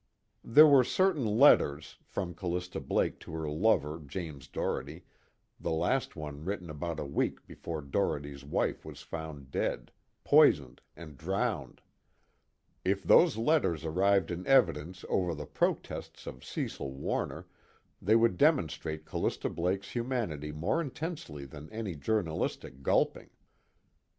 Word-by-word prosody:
There 150 +7 +8
were 140 -4 +7
certain 180 -2 +2
letters, 105 - +4
from 90 -3 -4
Callista 90 0 -3
Blake - - 0
to - - -10
her 80 -1 -3
lover 80 -2 +1
James 75 -3 -7
Doherty, 75 +6 -3 0.6
the - - -3
last 90 +11 0
one 75 -2 -7
written 90 -2 -4
about 80 +1 -4
a - - -3
week 70 - -2
before 80 -3 -6
Doherty's 70 0 -2
wife 70 - -1
was - - -10
found 75 -5 -7
dead - - -2 0.3
poisoned 110 - +4
and 80 -3 -10
drowned. 95 +5 -2 1.0
If - - 0
those - - +5
letters 115 - +1
arrived 95 +2 +2
in 90 +1 -5
evidence 90 - +2
over 90 -3 0
the - - -6
protests - - -2
of 65 - -8
Cecil 70 - -4
Warner, 70 - -3 0.6
they 105 +4 +4
would 115 -5 +3
demonstrate 80 - +1
Callista - - -2
Blake's 90 +3 -2
humanity 115 - -2
more 80 - 0
intensely 145 - -5
than 75 +3 -11
any 110 -4 -4
journalistic 80 - -2
gulping. - - +1
85 Hz, 130 wpm, -31 LUFS, 75-110 Hz, 1.0 s, There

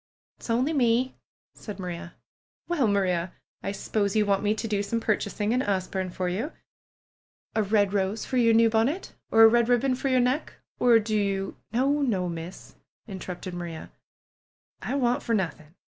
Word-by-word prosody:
'^IPs - - -11
only 255 +7 +1
me," 250 -1 +2 0.4
said 210 -3 -8
Maria. 175 -2 -6 0.5
"Well, 310 -9 +1
Maria! 185 -3 0 0.3
I 195 - -3
suppose 200 0 -1
you 215 -1 +3
want 200 -1 +2
me 210 +1 +1
to 225 +1 -3
do 205 -2 0
some 230 +3 -1
purchasing 210 -1 -1
in 250 +2 +2
Asburne 190 -3 -1
for 180 +1 -3
you! 215 - -2 1.0
A 220 - +2
red 205 -1 +2
rose 200 +2 -1
for 260 - -2
your 230 -2 +4
new 230 0 +6
bonnet? 230 - 0 0.2
Or 225 - +6
a - - +11
red 235 +1 +3
ribbon 245 +2 +3
for 265 +2 -2
your 255 -1 +3
neck? 255 +5 0 0.3
Or 240 -2 +6
do 215 0 -1
you 195 -2 -1
" - - -49
"No, 275 +5 +2
no. 200 -10 0
Miss 170 +1 -7 0.2
!" - - -51
interrupted 185 -2 -6
Maria. 170 -2 -6 0.9
"I - - -3
want 245 -3 +1
for 230 - 0
nothing. 160 -4 -3
215 Hz, 180 wpm, -26 LUFS, 190-240 Hz, 1.0 s, a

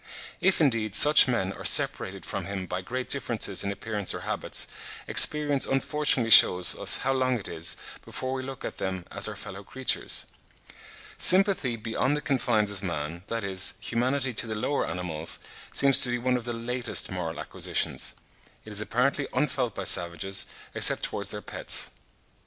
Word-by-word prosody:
If, 190 +1 +1
indeed, 115 - 0
such 150 +2 +8
men 100 -6 -2
are - - -12
separated - - +2
from - - -6
him 100 -1 -6
by 90 +1 -6
great 125 +7 -6
differences 115 -8 -1
in 100 - -3
appearance 105 -1 -2
or - - -7
habits, - - -2 0.4
experience 145 -2 +5
unfortunately 135 -3 -1
shews 90 -4 +7
us - - +3
how 135 - 0
long 130 -2 -1
it 100 - -8
is, 80 +1 -1 0.3
before 130 0 -6
we 130 - -4
look 135 0 -9
at - - -8
them 95 -2 -5
as - - +1
our - - -7
fellow 100 +2 -10
creatures. 130 +6 -2 0.9
Sympathy 185 - +4
beyond 115 +5 -3
the - - -5
confines 115 -7 -1
of 100 -2 -6
man, 85 -2 -6
that 115 -1 -5
is, 95 -2 0
humanity 125 +2 -2
to 115 - +2
the 110 - -5
lower 110 0 -3
animals, 85 -2 -4 0.3
seems 140 -1 +5
to 125 - +7
be 120 - -2
one 125 +1 -1
of 120 -2 -5
the 120 - -4
latest 120 0 -1
moral 85 -3 -6
acquisitions. - - -2 0.5
It 110 - -11
is 105 - -1
apparently 130 +6 -1
unfelt 125 -6 -2
by 100 - -6
savages, 90 +2 0 0.3
except - - +5
towards - - -2
their - - -6
pets. - - -3
115 Hz, 170 wpm, -25 LUFS, 95-130 Hz, 0.9 s, such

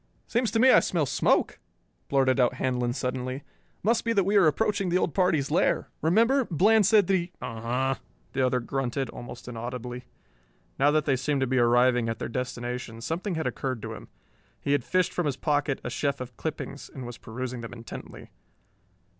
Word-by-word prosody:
"Seems 235 0 0
to - - 0
me 260 +2 +7
I - - +8
smell 165 -5 0
smoke," - - +1 0.5
blurted 135 -1 +3
out 125 -1 +3
Handlon 125 -2 0
suddenly. 130 +2 -3 0.4
"Must 225 +4 +2
be 230 - +1
that 200 -3 +3
we 200 +3 +1
are 195 -5 +6
approaching 200 +4 +1
the 175 - +3
old 165 - 0
party's 160 -7 +2
lair. 175 +5 +2
Remember? 230 - +4
Bland 205 +5 +4
said 215 -2 +5
that 195 - +1
he 175 -1 0
" - - -43
"Uh 115 -1 -6
huh!" 130 +3 0 0.4
the 135 - +1
other 125 0 +2
grunted, 135 0 -2
almost 120 0 -9
inaudibly. 125 +1 -6 0.7
Now 140 +2 +5
that 155 0 +2
they 140 - +3
seemed 135 +2 -1
to - - +3
be 130 0 +1
arriving 120 0 +4
at 115 - -2
their - - -4
destination 125 -1 -4
something 175 - -2
had 160 - -2
occurred 130 -5 -3
to - - -5
him. - - -10 0.5
He 140 - -2
had 145 -3 +2
fished 185 +4 +1
from 175 -3 0
his 135 -2 -2
pocket 145 -2 0
a 125 - -4
sheaf 140 +3 -1
of 125 -1 -7
clippings 150 -2 -5
and 130 -2 -7
was 120 0 -8
perusing 125 +1 -5
them 115 - -7
intently. 115 -1 -10
135 Hz, 195 wpm, -27 LUFS, 125-175 Hz, 0.7 s, I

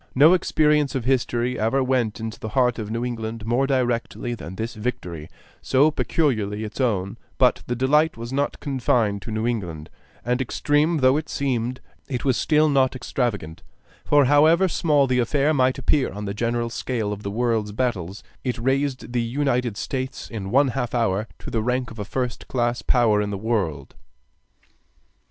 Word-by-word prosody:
No 150 +6 +7
experience 150 -5 +2
of 125 -4 -2
history 125 -1 0
ever 120 +5 +1
went 125 -4 0
to 115 -1 -5
the 110 - -5
heart 125 -2 +3
of 105 -2 -5
New 115 +2 -2
England 115 -2 -5
more 120 +4 +1
directly 120 -2 -1
than 95 -6 -8
this 115 +4 -4
victory, 90 -9 -5 0.3
so 140 +4 +3
peculiarly 110 -10 0
its 110 +5 -5
own: 100 -6 -1 0.2
but - - +3
the 120 - -1
delight 150 +5 +2
was 120 +2 -6
not 140 +1 -1
confined 120 -7 0
to 95 - -9
New 110 +1 -2
England, 90 -10 -3 0.3
and 125 +2 0
extreme 145 +4 +1
though 130 +2 +5
it 155 - -4
seemed, 130 -2 -2 0.3
it 125 -2 -4
was 130 -3 +3
still 155 +4 +3
not 135 -3 +2
extravagant; 115 - -3 0.4
for 145 -1 +4
however 155 +7 +5
small 150 -4 +2
the 125 -1 +1
affair 140 +5 +2
might 130 -2 +2
appear 140 -4 +1
on 105 +1 -6
the 100 - -3
general 115 +2 -1
scale 115 -4 -2
of 105 - -8
the 100 - -4
world's 110 -1 0
battles, 100 -5 -2 0.2
it 125 -1 -2
raised 135 +1 -1
the 120 - +1
United 125 -2 -1
States 130 +2 -4
in 100 -4 -5
one 135 +4 +4
half 125 -1 -3
hour 110 -2 0
to - - -9
the 115 - 0
rank 125 +2 -1
of 115 - -10
a 105 - -3
first 125 +2 -3
class 120 -1 0
Power 110 -4 +3
in 105 - -2
the 100 - -3
world. 95 - -2
120 Hz, 180 wpm, -23 LUFS, 110-135 Hz, 0.4 s, No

